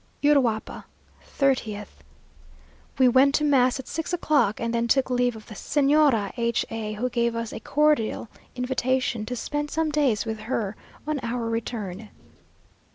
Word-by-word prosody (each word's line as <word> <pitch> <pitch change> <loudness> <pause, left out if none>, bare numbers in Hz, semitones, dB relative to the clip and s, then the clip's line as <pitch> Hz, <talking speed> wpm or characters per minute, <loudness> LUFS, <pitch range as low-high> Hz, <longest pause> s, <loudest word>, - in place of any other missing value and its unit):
URUAPA, 260 -7 +1 0.5
30th. 220 - -1 1.0
We 260 -1 +5
went 265 +3 +5
to 300 - +1
mass 265 -3 +3
at 265 - -8
six 325 +1 -4
o'clock; 290 - +2
and 230 0 -2
then 235 0 0
took 260 +2 +2
leave 245 -1 +1
of 220 - -11
the 220 - -10
Señora 280 -4 +2
H 235 -1 0
a, 220 -1 -4
who 225 +4 -2
gave 235 -1 0
us 230 -1 -4
a - - -5
cordial 295 -4 +1 0.3
invitation 250 -3 -1
to 250 - -3
spend 295 +4 -3
some 315 0 -1
days 275 -9 +1
with 220 -1 -4
her 215 -2 -3 0.3
on 305 -1 -1
our 235 -1 -3
return. 220 -3 -4
245 Hz, 155 wpm, -25 LUFS, 225-280 Hz, 1.0 s, We